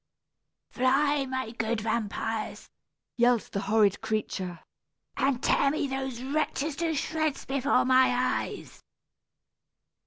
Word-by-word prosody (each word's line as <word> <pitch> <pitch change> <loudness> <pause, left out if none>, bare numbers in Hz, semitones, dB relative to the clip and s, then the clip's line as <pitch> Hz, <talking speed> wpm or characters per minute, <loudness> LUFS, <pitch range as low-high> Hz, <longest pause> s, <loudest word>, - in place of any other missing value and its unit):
"Fly, 275 +2 +2
my 260 -3 -3
good 225 -1 -2
vampires!" 225 0 -3 0.5
yelled 240 -1 +2
the 195 - -2
horrid 205 0 +2
creature, 185 -5 -3 0.5
"and 265 -2 0
tear 275 - +3
me 295 +1 -1
those 265 -2 -4
wretches 295 +1 -1
to 330 -1 0
shreds 310 0 -1
before 265 -1 +2
my 255 0 +5
eyes!" 250 0 -2
255 Hz, 105 wpm, -28 LUFS, 225-275 Hz, 0.5 s, my